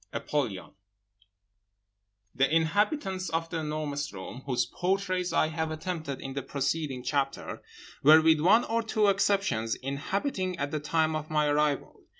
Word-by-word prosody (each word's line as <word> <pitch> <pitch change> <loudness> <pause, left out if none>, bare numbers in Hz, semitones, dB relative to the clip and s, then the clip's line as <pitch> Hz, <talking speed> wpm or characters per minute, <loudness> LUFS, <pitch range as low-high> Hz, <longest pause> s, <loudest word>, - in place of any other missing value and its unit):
APOLLYON 120 -11 -2 1.6
The 135 +1 +2
inhabitants 190 - +1
of 165 0 -2
The 165 - -2
Enormous 150 -2 -3
Room 100 +6 -8
whose 125 -2 +1
portraits 185 +3 -1
I 155 -1 +2
have 160 0 -2
attempted 155 -3 -4
in 135 - -6
the 140 - -3
preceding 140 -2 -2
chapter, 135 +1 -2 0.4
were, 155 +3 +8
with 160 -1 +5
one 210 +8 +5
or 230 +1 0
two 215 -2 +2
exceptions, 195 - +1
inhabiting 185 - -2
at 140 0 -2
the 155 - -1
time 155 +1 +1
of 155 0 -4
my 150 -1 +2
arrival. 145 -1 0
155 Hz, 145 wpm, -28 LUFS, 140-185 Hz, 1.6 s, were